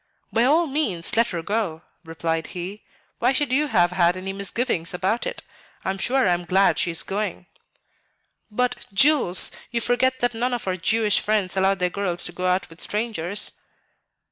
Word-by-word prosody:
"By 230 Hz, +2 st, +3 dB
all 315 Hz, +6 st, +4 dB
means, 240 Hz, -, -1 dB
let 230 Hz, +1 st, +4 dB
her 170 Hz, -6 st, -4 dB
go," 190 Hz, -5 st, -2 dB, 0.2 s
replied 165 Hz, 0 st, -3 dB
he; 190 Hz, +4 st, -6 dB, 0.4 s
"why 245 Hz, +2 st, +3 dB
should 255 Hz, -1 st, 0 dB
you 295 Hz, +3 st, +2 dB
have 175 Hz, -9 st, +3 dB
had 180 Hz, 0 st, +2 dB
any 190 Hz, +1 st, -5 dB
misgivings 200 Hz, -3 st, -2 dB
about 195 Hz, +6 st, 0 dB
it? -, -, -5 dB, 0.4 s
I 190 Hz, -, +1 dB
am 195 Hz, -, -6 dB
sure 255 Hz, +3 st, +3 dB
I 180 Hz, -, +4 dB
am 175 Hz, 0 st, -2 dB
glad 190 Hz, +3 st, +3 dB
she -, -, +1 dB
is 165 Hz, -, 0 dB
going." 195 Hz, -2 st, -3 dB, 1.0 s
"But, 250 Hz, +3 st, -1 dB
Jules, 240 Hz, -, +4 dB, 0.2 s
you 235 Hz, -, -1 dB
forget 260 Hz, +2 st, +1 dB
that 245 Hz, -1 st, 0 dB
none 245 Hz, +2 st, -1 dB
of 240 Hz, -, -6 dB
our 185 Hz, -, 0 dB
Jewish 210 Hz, +3 st, +2 dB
friends 205 Hz, -4 st, 0 dB
allow 190 Hz, +1 st, +3 dB
their 180 Hz, -2 st, -1 dB
girls 180 Hz, -3 st, -1 dB
to -, -, -4 dB
go 180 Hz, +1 st, -3 dB
out 185 Hz, +1 st, +1 dB
with 165 Hz, 0 st, -14 dB
strangers." 210 Hz, -3 st, -1 dB
195 Hz, 185 wpm, -23 LUFS, 180-240 Hz, 1.0 s, all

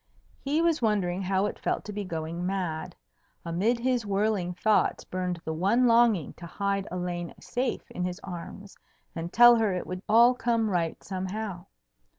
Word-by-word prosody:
He 295 Hz, +4 st, 0 dB
was 335 Hz, -4 st, +2 dB
wondering 195 Hz, -5 st, +1 dB
how 190 Hz, +1 st, +1 dB
it 210 Hz, -, -4 dB
felt -, -, -2 dB
to 210 Hz, -, -6 dB
be 205 Hz, 0 st, -3 dB
going 165 Hz, -1 st, -4 dB
mad. 180 Hz, -3 st, -3 dB, 0.5 s
Amid 190 Hz, +9 st, +1 dB
his 250 Hz, 0 st, 0 dB
whirling 200 Hz, -3 st, 0 dB
thoughts 215 Hz, +4 st, +2 dB
burned 180 Hz, -1 st, -3 dB
the 160 Hz, -, -2 dB
one 200 Hz, +10 st, +2 dB
longing 230 Hz, -, +3 dB
to 170 Hz, -, -9 dB
hide 200 Hz, +2 st, -2 dB
Elaine 175 Hz, -1 st, -4 dB
safe 250 Hz, 0 st, -2 dB
in 180 Hz, -, -4 dB
his 180 Hz, 0 st, -3 dB
arms 190 Hz, +2 st, -8 dB, 0.4 s
and 170 Hz, +1 st, -5 dB
tell 240 Hz, +2 st, +8 dB
her 220 Hz, -4 st, +1 dB
it 180 Hz, -, -3 dB
would 185 Hz, 0 st, -5 dB
all 235 Hz, +3 st, +7 dB
come 230 Hz, -3 st, 0 dB
right 170 Hz, -3 st, -1 dB
somehow. 190 Hz, 0 st, -5 dB
195 Hz, 165 wpm, -27 LUFS, 180-225 Hz, 0.5 s, tell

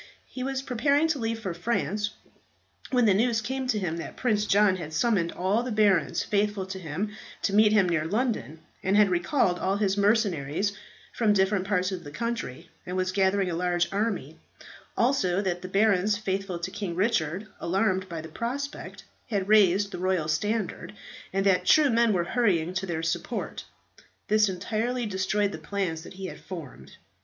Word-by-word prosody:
He 255 Hz, -, -8 dB
was 265 Hz, 0 st, -2 dB
preparing 280 Hz, +5 st, +2 dB
to 305 Hz, -3 st, 0 dB
leave 225 Hz, -1 st, -1 dB
for 195 Hz, -6 st, -4 dB
France, 205 Hz, +2 st, -1 dB, 0.8 s
when 250 Hz, -3 st, +3 dB
the 205 Hz, -, +5 dB
news 225 Hz, +3 st, +2 dB
came 260 Hz, +4 st, -3 dB
to 240 Hz, -4 st, +1 dB
him 175 Hz, -5 st, -2 dB
that 170 Hz, -, -7 dB
Prince 215 Hz, -4 st, +1 dB
John 200 Hz, -2 st, +4 dB
had 160 Hz, -3 st, -7 dB
summoned 180 Hz, -1 st, +1 dB
all 195 Hz, +5 st, 0 dB
the 250 Hz, 0 st, -4 dB
barons 205 Hz, -7 st, +2 dB
faithful 205 Hz, -1 st, 0 dB
to 190 Hz, 0 st, -6 dB
him 180 Hz, +5 st, -3 dB, 0.3 s
to 200 Hz, -, 0 dB
meet 210 Hz, 0 st, +6 dB
him 205 Hz, -4 st, +4 dB
near 165 Hz, -3 st, 0 dB
London, 210 Hz, -, -2 dB, 0.2 s
and 195 Hz, +2 st, +2 dB
had 210 Hz, -3 st, +5 dB
recalled 180 Hz, -, +1 dB
all 190 Hz, +1 st, 0 dB
his 200 Hz, -1 st, +1 dB
mercenaries 200 Hz, -4 st, +1 dB, 0.4 s
from 220 Hz, -3 st, +2 dB
different 195 Hz, -1 st, +1 dB
parts 185 Hz, -2 st, +1 dB
of 180 Hz, -2 st, -5 dB
the 145 Hz, -, -8 dB
country, 200 Hz, -, -4 dB, 0.2 s
and 180 Hz, +1 st, -4 dB
was 185 Hz, 0 st, 0 dB
gathering 190 Hz, -1 st, +2 dB
a -, -, -2 dB
large 175 Hz, 0 st, 0 dB
army; 210 Hz, +2 st, -2 dB, 0.6 s
also, 230 Hz, -8 st, +2 dB
that 180 Hz, -3 st, -1 dB
the 185 Hz, -, -6 dB
barons 200 Hz, +1 st, +2 dB
faithful 195 Hz, -3 st, -3 dB
to 175 Hz, +2 st, -5 dB
King 190 Hz, -5 st, -4 dB
Richard, 190 Hz, -2 st, 0 dB
alarmed 190 Hz, +1 st, 0 dB
by 165 Hz, -2 st, -5 dB
the 160 Hz, -, -8 dB
prospect, 255 Hz, -, -5 dB, 0.3 s
had 200 Hz, -4 st, -1 dB
raised 200 Hz, -1 st, +4 dB
the -, -, -6 dB
royal 185 Hz, -4 st, 0 dB
standard, 205 Hz, +8 st, -2 dB, 0.4 s
and 195 Hz, +1 st, 0 dB
that 190 Hz, -2 st, +3 dB
true 300 Hz, -3 st, +5 dB
men 230 Hz, 0 st, +3 dB
were 180 Hz, -4 st, +1 dB
hurrying 180 Hz, -5 st, +1 dB
to 190 Hz, +1 st, -2 dB
their 165 Hz, -2 st, -3 dB
support. 165 Hz, 0 st, -3 dB, 0.6 s
This 215 Hz, -1 st, +4 dB
entirely 225 Hz, +6 st, -2 dB
destroyed 200 Hz, +1 st, 0 dB
the -, -, -7 dB
plans 185 Hz, -6 st, -3 dB
that 170 Hz, -, -11 dB
he 190 Hz, +1 st, -7 dB
had -, -, -7 dB
formed. 140 Hz, -, -9 dB
195 Hz, 180 wpm, -27 LUFS, 180-220 Hz, 0.8 s, meet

